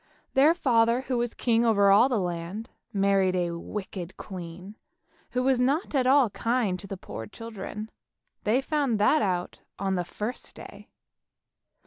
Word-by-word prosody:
Their 295 +5 +5
father, 235 -5 +3
who 255 -2 -2
was 240 -1 -2
king 230 -1 +2
over 200 -4 +4
all 210 +7 +6
the 245 - +1
land, 180 +3 -4 0.2
married 195 -2 +2
a 175 -1 0
wicked 185 0 -6
queen 185 +1 -8 0.6
who 250 0 +1
was 260 -1 +3
not 280 +9 +1
at 260 -3 +2
all 265 -4 +5
kind 230 -6 0
to 200 - -9
the 195 - -6
poor 110 -10 -8
children; 215 - -7 0.5
they 235 +5 +2
found 280 -5 0
that 210 +9 +4
out 180 -3 -1 0.2
on 195 0 -1
the 180 -1 0
first 210 +7 -6
day. - - -12
215 Hz, 155 wpm, -27 LUFS, 190-250 Hz, 0.6 s, all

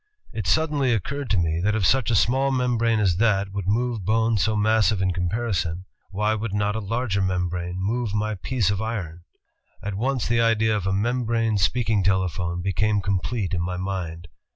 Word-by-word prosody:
It 110 -5 -4
suddenly 145 - +2
occurred 140 +7 -4
to 100 - +2
me, 85 -1 0
that 105 +2 +2
if 105 -4 +1
such 130 +5 +3
a 115 - +2
small 130 +7 +3
membrane 120 -4 +1
as 95 -5 +2
that 100 -3 +2
would 100 -2 -4
move 115 0 0
bones 110 +1 +2
so 110 +2 +1
massive 110 -1 +2
in 95 -1 +1
comparison, 90 -2 -2 0.2
why 105 +2 0
would 110 -1 -3
not 105 0 0
a - - -1
larger 110 -1 -1
membrane 90 -1 -2
move 110 +4 -1
my 105 +1 -1
piece 100 +2 0
of 100 0 -2
iron? 95 -7 -4 0.6
At 105 0 -3
once 125 +5 -1
the 115 0 +2
idea 110 -1 +2
of 100 -2 -2
a - - +1
membrane 115 0 0
speak 110 +6 +1
ing 105 -2 +3
telephone 90 -2 0
became 105 +3 +1
complete 100 +1 -2
in 85 - 0
my 90 +1 -3
mind. 90 -3 -4
105 Hz, 190 wpm, -24 LUFS, 95-115 Hz, 0.6 s, such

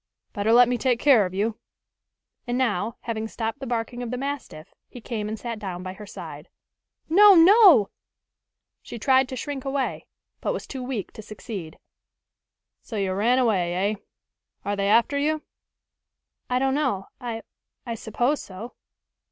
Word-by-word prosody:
"Better 205 0 0
let 245 +1 +7
me 245 0 -1
take 245 -1 +1
care 245 -9 +5
of 180 - -11
you." 215 +3 -1 0.9
And 240 0 -1
now, 230 -3 -1
having 220 -1 -3
stopped 225 +3 -4
the 270 - -6
barking 240 +1 -3
of 245 - -4
the 250 - -3
mastiff, 270 - -6 0.2
he 245 - -10
came 220 -3 -4
and 220 - -4
sat 230 -1 -5
down 185 -3 -6
by 185 0 -5
her 210 +2 -11
side. - - -9 0.6
"No! 400 +4 +7
no!" 355 - +7 0.9
She - - -8
tried 260 +2 +3
to 260 - -5
shrink 275 +1 -5
away, 270 -1 -2 0.3
but - - -1
was - - -5
too 265 - -7
weak 250 -6 -4
to - - -10
succeed. 205 -5 -8 1.0
"So 225 - -9
you 195 -2 -1
ran 230 +6 +2
away, 190 -9 +1 0.2
eh? - - -3 0.7
Are 205 - -1
they 200 0 0
after 235 +6 +3
you?" 310 +1 0 1.1
"I 250 - +1
don't 265 +1 +1
know. 260 -10 -1
I 235 -3 -5 0.4
I 235 - -3
suppose 240 +6 -1
so." 205 +6 -9
235 Hz, 165 wpm, -25 LUFS, 210-265 Hz, 1.1 s, let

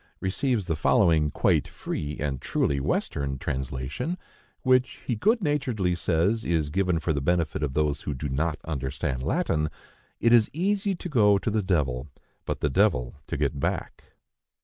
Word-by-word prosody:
receives 105 +3 0
the 80 -3 -1
following 80 -1 +3
quite - - +2
free 75 0 -5
and 70 -3 -2
truly 70 -1 0
Western 70 0 -1
translation, 65 - -3 0.5
which, 130 -1 +2
he 120 - 0
good 220 - +2
naturedly 125 - 0
says, 90 +6 +1
is 80 -4 0
given 90 0 +1
for 80 0 0
the 70 - -1
benefit 80 0 0
of 70 -3 -2
those 75 -1 +1
who 75 - -3
do 70 +3 -3
not 75 +4 -1
understand 65 -3 -3
Latin,—"It 75 - -1
is 115 -3 +6
easy 195 +4 0
to 180 - -6
go 105 - +4
to 105 - -2
the 110 0 +1
devil, 75 -9 0 0.4
but - - -3
the 75 - +2
devil 65 - +2
to - - -3
get 70 -1 -1
back." - - -3
80 Hz, 160 wpm, -26 LUFS, 70-110 Hz, 0.5 s, is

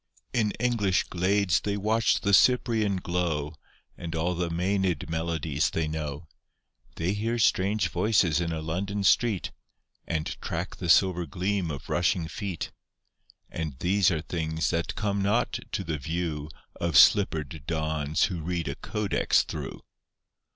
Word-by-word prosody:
In 115 -4 +2
English 115 -6 +2
glades 95 +1 +1
they 100 0 -2
watch 110 +3 +2
the 100 - +1
Cyprian 110 -2 +4
glow, 85 -5 -2 0.4
And 85 -2 -6
all 85 +3 0
the 85 0 -2
Maenad 90 -2 -1
melodies 80 -3 -1
they 80 -1 -1
know. 75 0 -5 0.7
They 85 +4 -1
hear 115 +3 -1
strange 105 -1 +2
voices 95 -7 +2
in 85 -1 -1
a 80 -1 -3
London 100 +5 -2
street, 105 0 +2 0.6
And 80 -2 -1 0.2
track - - -4
the 90 - -4
silver 90 0 +4
gleam 90 +3 -1
of 70 -3 -6
rushing 85 -1 +1
feet; 90 +1 -5 0.8
And 80 -5 -4
these 95 +5 +3
are 80 -3 -1
things 80 -2 -2
that 85 -1 -2
come 100 -1 -1
not 105 +5 +1
to 95 - -2
the 80 -4 -3
view 80 0 -3 0.3
Of 85 -2 +1
slippered 80 -7 +4
dons 80 -2 0
who 90 -4 0
read 85 0 -2
a 70 - -2
codex 105 -1 +1
through. - - -6
85 Hz, 145 wpm, -27 LUFS, 80-100 Hz, 0.8 s, Cyprian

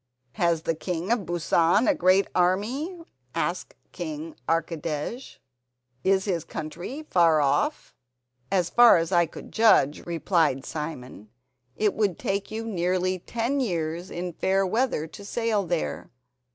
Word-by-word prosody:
"Has 170 +2 0
the 165 - 0
king 175 +4 -3
of 230 -6 0
Busan 175 +4 +2
a 305 - +5
great 195 -8 +3
army?" 235 - 0 0.3
asked - - -2 0.2
King 315 +1 -6
Archidej; 165 - -3 0.7
"is 190 0 +2
his 175 -6 -1
country 175 - -6
far 165 -3 +5
off?" 145 - 0 0.6
"As 180 -3 +1
far 240 -5 +7
as 165 +2 -1
I 175 -2 +4
could - - -11
judge," 215 -10 +4
replied 165 -5 +1
Simon, 130 - -6 0.5
"it 210 -2 +1
would 205 -6 0
take 195 0 -2
you 225 +1 -5
nearly 185 -2 0
ten 235 +9 -2
years 170 -6 -2
in 175 0 -5
fair 195 +3 +1
weather 225 -5 0
to 200 +6 -11
sail 215 -2 -1
there. 170 -2 -2
180 Hz, 135 wpm, -26 LUFS, 165-220 Hz, 0.7 s, far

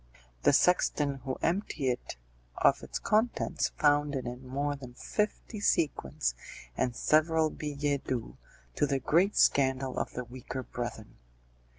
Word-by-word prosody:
The - - +5
sexton 145 -3 +3
who 130 -1 -2
emptied 165 -7 0
it 120 - -5 0.4
of - - +4
its - - -5
contents 220 +3 +1
found 145 -1 +3
in 130 - -3
it 125 +1 -5
more 140 +3 -2
than 130 -3 -11
fifty 210 - -2
sequins, 145 - +1 0.4
and 125 - 0
several 155 +2 +3
billets 145 -2 -2
doux, 125 -3 -3 0.4
to 145 - +3
the 140 -1 +1
great 175 +10 +2
scandal 130 -1 +3
of - - -3
the 125 - -4
weaker 130 +1 -7
brethren. 120 -3 -6
140 Hz, 140 wpm, -30 LUFS, 130-155 Hz, 0.4 s, The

